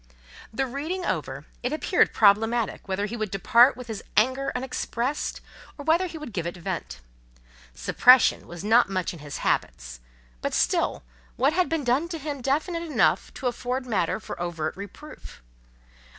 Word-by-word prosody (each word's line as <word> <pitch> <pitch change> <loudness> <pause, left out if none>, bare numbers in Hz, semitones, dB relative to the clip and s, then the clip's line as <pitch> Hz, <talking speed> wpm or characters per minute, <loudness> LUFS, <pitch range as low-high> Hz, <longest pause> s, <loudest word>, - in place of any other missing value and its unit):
The 270 +5 -1
reading 310 +8 -4
over, - - -3 0.2
it 250 - -2
appeared 315 +4 +2
problematic 220 +2 +2
whether 195 +1 -1
he 220 - -5
would 215 -3 -3
depart 235 +7 +4
with 250 - -8
his 220 -4 -6
anger 260 +5 +2
unexpressed, 250 +1 -3 0.4
or 285 - -8
whether 335 +4 +3
he 330 - -8
would 300 -8 -8
give 170 -3 -2
it 175 - -6
vent. 175 - -5 0.7
Suppression 245 - +5
was 175 +2 -8
not 220 +1 +4
much 185 -2 -2
in 170 - -10
his 145 -1 -7
habits; - - -1 0.4
but - - -2
still, - - +1 0.3
what 275 +5 +2
had 365 +1 +1
been 325 -3 -1
done 260 +7 +1
to 335 - -4
him 290 -2 -5
definite 310 +6 -1
enough 330 -3 +1
to 270 - -8
afford 250 +1 -2
matter 205 -6 0
for 215 - -8
overt 165 -3 -3
reproof? 200 - -11
240 Hz, 165 wpm, -25 LUFS, 195-285 Hz, 0.7 s, Suppression